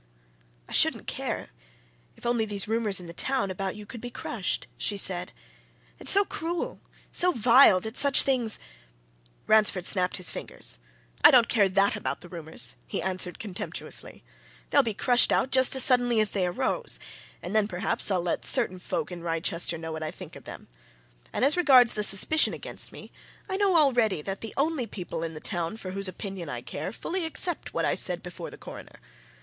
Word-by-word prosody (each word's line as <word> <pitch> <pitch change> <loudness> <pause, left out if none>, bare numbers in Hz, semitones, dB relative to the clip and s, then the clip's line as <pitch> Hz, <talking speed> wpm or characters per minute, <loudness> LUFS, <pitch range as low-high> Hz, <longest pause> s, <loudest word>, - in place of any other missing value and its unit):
"I - - -16
shouldn't - - +3
care, - - -5 0.6
if - - -15
only 235 -1 +1
these 205 -1 -1
rumours 220 -3 0
in 180 - -11
the 170 - -10
town 255 0 -2
about 190 0 -4
you 210 0 -10
could 230 +1 -10
be 245 - -7
crushed!" 220 -4 -3
she 205 - -1
said. 180 -2 +3 0.7
"It's - - 0
so 400 +1 +5
cruel, 340 -1 -5 0.3
so 360 +1 +2
vile, 235 - +5
that 220 +4 -7
such 280 -1 +7
things 245 -5 +5 0.4
" - - -36
Ransford 210 -4 +3
snapped 185 -2 +1
his 180 - 0
fingers. - - -4 0.4
"I - - +10
don't 240 -2 +5
care 205 -5 +2
that 195 +1 +1
about - - -5
the 175 - -13
rumours!" 165 -2 -2
he - - -4
answered, 185 0 -2
contemptuously. 195 -4 -5 0.5
"They'll 285 - +5
be 225 -5 -4
crushed 245 +3 +4
out 260 - 0
just 260 0 +5
as 265 - +5
suddenly 245 -2 +3
as 215 -1 +2
they 185 -3 -1
arose 175 - -1 0.4
and 205 - -5
then, 215 -1 +2
perhaps, 180 +1 +1
I'll 185 -3 -1
let 175 - -2
certain 185 0 +1
folk 180 - -4
in 175 -1 -8
Wrychester 170 +1 -1
know 160 0 -7
what 160 0 -6
I 155 - -4
think - - -11
of - - -13
them. - - -10 0.6
And - - 0
as 285 - +3
regards 265 -9 +5
the 210 - -2
suspicion 210 +10 +3
against - - -3
me, - - -12 0.4
I 380 - -4
know 390 -3 +2
already 240 - +2
that 195 +3 -6
the 225 - -8
only 285 -4 -1
people 175 -5 -7
in 165 -1 -5
the - - -7
town 170 +5 -4
for 185 -4 -7
whose 195 +1 -1
opinion 185 -3 -7
I 120 -2 -5
care 145 +8 -6
fully 350 - -4
accept 325 +1 0
what - - 0
I - - +1
said - - 0
before - - -8
the - - -13
Coroner. - - -12
205 Hz, 195 wpm, -26 LUFS, 180-245 Hz, 0.7 s, I